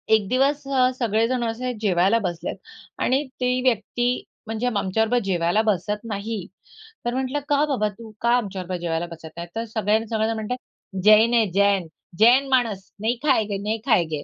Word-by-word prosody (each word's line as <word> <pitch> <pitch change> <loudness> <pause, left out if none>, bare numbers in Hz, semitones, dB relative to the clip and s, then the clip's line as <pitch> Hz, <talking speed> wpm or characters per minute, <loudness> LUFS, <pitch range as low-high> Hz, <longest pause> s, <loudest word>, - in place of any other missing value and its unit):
एक 210 -3 0
दिवस 275 +3 +2
अ, 260 -2 +3
सगळेजण 235 +2 +1
असे 240 +2 -2
जेवायला 195 +2 +3
बसलेत 175 -4 -4 0.5
आणि 265 +3 +2 0.2
ती 250 0 +1
व्यक्ती, 245 0 0 0.2
म्हणजे 225 +2 -2
आमच्याबरोबर 220 +2 +1
जेवायला 175 +2 +2
बसत 210 0 -1
नाही. 205 -1 -4 0.6
तर 240 - 0
म्हटलं 260 +2 -1
का 290 0 +3
बाबा, 260 -8 0
तू 220 +2 -12
का 235 - +1
आमच्याबरोबर 190 -5 -4
जेवायला 165 0 -1
बसत 165 -1 -9
नाही? 170 0 -5
तर 225 +1 -2
सगळ्यांना 220 0 0
सगळेजण 220 0 0
म्हणत 220 +1 -5
आहेत 200 -6 -7
"जैन 215 +3 +6
है 230 -2 +4
जैन. 200 -2 +2 0.3
जैन 250 +5 +6
माणस. 230 -7 0
नहीं 230 +3 0
खायेंगे, 220 -8 +2
नहीं 210 +3 -2
खायेंगे." 160 - +1
220 Hz, 165 wpm, -23 LUFS, 195-245 Hz, 0.6 s, जैन